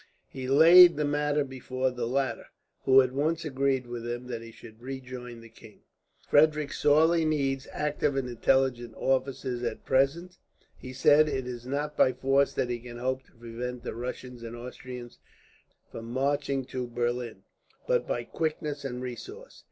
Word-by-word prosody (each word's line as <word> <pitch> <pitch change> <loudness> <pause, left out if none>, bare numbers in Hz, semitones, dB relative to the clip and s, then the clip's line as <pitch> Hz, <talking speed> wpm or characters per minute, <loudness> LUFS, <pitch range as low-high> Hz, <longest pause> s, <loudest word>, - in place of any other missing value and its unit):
He 130 -1 -6
laid 170 +5 +8
the 150 - 0
matter 145 0 +1
before 130 -1 -3
the 125 -2 -3
latter, 135 +2 -1 0.4
who 135 0 +7
at 130 - -3
once 155 +5 -1
agreed 135 -2 0
with 120 -1 -6
him 120 +1 -4
that 115 -2 -4
he 115 - -10
should 110 0 -15
rejoin 125 -2 -8
the 115 - -13
king. 110 -1 -17 0.5
"Frederick 150 -1 +3
sorely 160 +3 +4
needs 135 -4 0
active 150 -1 -1
and 135 -2 -1
intelligent 120 -1 +1
officers, 130 -1 -1
at 115 -2 -4
present," 140 +7 +1 0.4
he 130 - -10
said. 145 +4 +4
"It 135 -3 -2
is 125 -1 -7
not 145 +3 -2
by 130 - +4
force 135 +1 +2
that 125 - -1
he 120 - -3
can 120 0 -10
hope 130 +2 -2
to - - -27
prevent 120 +1 -6
the - - -4
Russians 125 +1 -6
and 115 0 -7
Austrians 125 0 -9 0.7
from 115 - -8
marching 135 +2 -1
to 125 -1 -4
Berlin, 120 0 -3 0.4
but - - +1
by - - -2
quickness 150 -2 -3
and 125 -2 -5
resource. 405 - -9
130 Hz, 165 wpm, -28 LUFS, 120-145 Hz, 0.7 s, laid